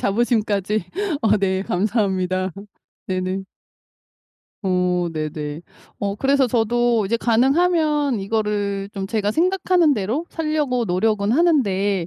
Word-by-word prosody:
자부심까지. 210 -2 0 0.4
어 215 -1 +4
네 190 -1 0
감사합니다. 185 -2 0 0.6
네네. 185 +1 -2 1.2
어 180 -2 +1
네네. 155 0 -4 0.4
어 200 -1 -2
그래서 270 +2 +2
저도 235 -1 +1
이제 230 +4 +1
가능하면 290 +3 +2
이거를 200 -1 -1
좀 195 -1 -4
제가 210 -1 -1
생각하는 355 - +2
대로 225 - -2
살려고 300 -6 -1
노력은 200 +2 +1
하는데 205 - +2
210 Hz, 250 characters per minute, -21 LUFS, 190-255 Hz, 1.2 s, 어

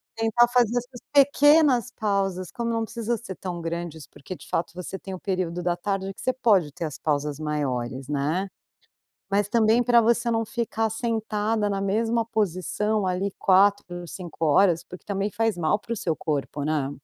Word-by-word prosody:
Tentar 225 +1 +3
fazer 240 -1 +2
as 245 - -1
suas 245 -2 -13
pequenas 285 -2 +5
pausas, 195 -5 -1
como 235 -2 -3
não 225 -1 0
precisa 230 +1 -2
ser 210 -5 -8
tão 180 -2 -5
grandes, 165 -2 -5
porque 165 - -9
de - - -14
fato 165 - -1
você 180 +2 -6
tem 190 0 -8
o 185 - -6
período 180 -3 -2
da 175 0 0
tarde 195 +1 -3
que - - -12
você 255 - +1
pode 200 - +3
ter 165 - -5
as 150 -4 -6
pausas 145 -1 -1
maiores, 135 -4 -3
né? 150 +7 -1 0.8
Mas 200 0 +1
também 225 +1 +4
pra 240 -1 +5
você 235 +1 +2
não 225 0 +1
ficar 225 -1 -2
sentada 220 -2 -1
na 195 -1 -1
mesma 225 +4 +1
posição 210 0 -1
ali 185 +2 -1
4, 190 -2 +3
5 170 -2 -5
horas, 165 +2 +4
porque 180 - -12
também 200 0 -2
faz 225 -1 0
mal 170 +4 +1
pro 230 +2 -5
seu 170 -7 -2
corpo, 145 -2 -3
né? 150 -3 0
200 Hz, 180 wpm, -25 LUFS, 175-225 Hz, 0.8 s, pequenas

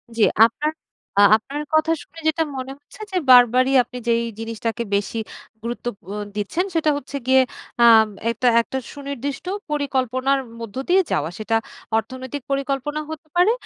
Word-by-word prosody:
জি 225 - -1 0.2
আপনার 295 +7 -1 0.5
আ 205 - +7
আপনার 275 +7 -4
কথা 315 +1 +3
শুনে 330 - -15
যেটা 315 +1 +2
মনে 260 +1 -5
হচ্ছে 290 +8 -16
যে, - - -5
বারবারই 250 +1 +6
আপনি 250 +1 -10
যেই 235 0 +2 0.2
জিনিসটাকে 230 +1 -3
বেশি 200 +3 -2 0.4
গুরুত্ব 235 +2 -5 0.2
ব - - -22 0.3
দিচ্ছেন 265 - -1
সেটা 310 -2 +3
হচ্ছে 280 0 -6
গিয়ে। 260 0 +5 0.4
আ - - +7 0.5
একটা 250 +2 -1
একটা 265 +3 -5 0.2
সুনির্দিষ্ট 280 0 -5 0.2
পরিকল্পনার 270 -2 0 0.2
মধ্য 230 -3 -8
দিয়ে 375 +2 +5
যাওয়া। 150 +1 0
সেটা 220 +1 -1 0.4
অর্থনৈতিক 260 +5 -5
পরিকল্পনা 275 +2 -1
হতে 315 0 -8
পারে। 360 +5 +5
260 Hz, 150 wpm, -22 LUFS, 235-290 Hz, 0.5 s, আ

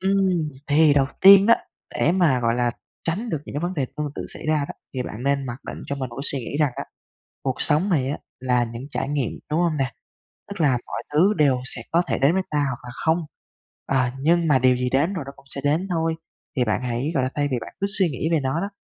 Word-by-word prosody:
Ừm, 190 -4 +2 0.2
thì 150 0 +5
đầu 135 -2 +4
tiên 195 +1 +9
đó, 230 - +8 0.4
để 170 - +3
mà, 160 -9 +3
gọi 115 0 +2
là, 120 0 +1 0.3
tránh 200 +9 -2
được 160 - 0
những - - -9
cái 145 - -1
vấn 175 +2 -2
đề 135 -4 -1
tương 150 0 -2
tự - - -4
xảy - - -8
ra 155 0 +3
đó, - - -6 0.2
thì 130 - -1
bạn 120 0 -7
nên 140 -1 0
mặc 120 0 -4
định - - -6
cho 140 - -3
mình 130 -2 -3
một 120 - -10
cái 140 - -4
suy 140 - -1
nghĩ 130 +3 -5
rằng 145 -4 +3
á, 140 - -3 0.6
cuộc 130 -2 -2
sống 155 +7 +2
này 135 -6 +2
á, 150 - -3 0.2
là 125 -1 +2
những 115 +1 -7
trải 135 - -2
nghiệm, 140 -5 -1 0.2
đúng 155 +3 +1
hông 170 -3 +1
nè? 135 -3 -1 0.6
Tức 200 -3 -7
là 150 - +4 0.2
mọi 115 - -4
thứ 185 +8 +4
đều 140 -4 +3
sẽ 125 -3 -6
có 170 - +4
thể - - -1
đến 140 +4 +4
với 190 - +2
ta 150 - 0
hoặc 130 -3 -2
là 125 - -7
không, 160 +2 +3 0.7
à, 130 -2 +1
nhưng 165 +3 +3
mà 135 - +5
điều 130 0 +4
gì 125 0 -1
đến 145 +8 +2
rồi 165 -7 -3
nó 140 - -7
cũng 140 - -19
sẽ 140 - -5
đến 155 +7 +1
thôi. 165 -1 0 0.4
Thì 125 - +3
bạn 110 +2 0
hãy, 125 +4 -1
gọi 135 - +2
là, 130 - -1
thay 145 -1 0
vì 130 - +1
bạn 115 - -9
cứ 200 - +1
suy 190 - +4
nghĩ 150 +4 -2
về 160 - +3
nó 135 +5 0
đó, 200 - -3
145 Hz, 270 wpm, -23 LUFS, 130-165 Hz, 0.7 s, tiên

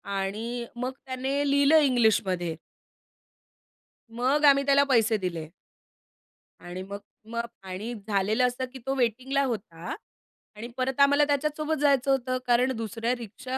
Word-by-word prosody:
आणि 220 +5 -3
मग 250 +2 -3
त्याने 270 +2 -1
लिहिलं 285 +3 +5
इंग्लिशमध्ये. 200 - +2 1.6
मग 270 +5 +2
आम्ही 280 -1 +6
त्याला 280 0 +5
पैसे 225 -3 +3
दिले. 170 -5 -4 1.1
आणि 175 +1 -7
मग 200 +1 -7 0.3
मग 235 0 -2 0.2
आणि 190 +6 -5
झालेलं 215 +4 +2
असं 250 +1 -3
की 265 - -8
तो 270 0 -1
वेटिंगला 255 +3 0
होता 200 -9 -4 0.6
आणि 225 +3 -7
परत 260 +1 -1
आम्हाला 285 +1 +5
त्याच्यासोबत 300 +2 0
जायचं 275 -2 +3
होतं 255 -1 0
कारण 245 +2 +3
दुसऱ्या 230 +2 -2
रिक्षा 240 +3 -6
245 Hz, 130 wpm, -27 LUFS, 215-275 Hz, 1.6 s, आम्ही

